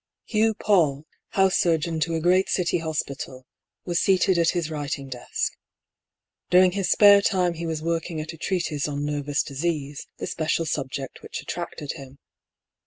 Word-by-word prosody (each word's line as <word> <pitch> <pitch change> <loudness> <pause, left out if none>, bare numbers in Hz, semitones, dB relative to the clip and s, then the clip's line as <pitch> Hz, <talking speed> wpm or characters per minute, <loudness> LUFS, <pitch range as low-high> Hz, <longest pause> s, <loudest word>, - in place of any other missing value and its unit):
Hugh 220 0 +2
Paull, 160 -9 +2 0.2
house 190 -1 +3
surgeon 165 -2 +1
to 165 +2 0
a - - 0
great 180 +3 +3
City 175 -1 +1
hospital, 140 -5 -4 0.4
was 175 -1 0
seated 190 -1 +3
at 165 -1 +4
his 170 -3 -1
writing 145 -2 -4
desk. 125 -2 -3 1.0
During 180 0 +6
his 195 0 -1
spare 205 -1 +7
time 180 -3 +1
he 170 0 -5
was 160 -1 -3
working 165 0 -2
at 155 +2 -5
a - - -11
treatise 160 -5 -1
on 145 0 -3
nervous 145 -1 -1
disease, 145 -1 -3
the - - -4
special 160 +1 -1
subject 135 -3 -4
which - - -6
attracted 150 - -5
him. 135 0 -11
165 Hz, 160 wpm, -25 LUFS, 145-180 Hz, 1.0 s, spare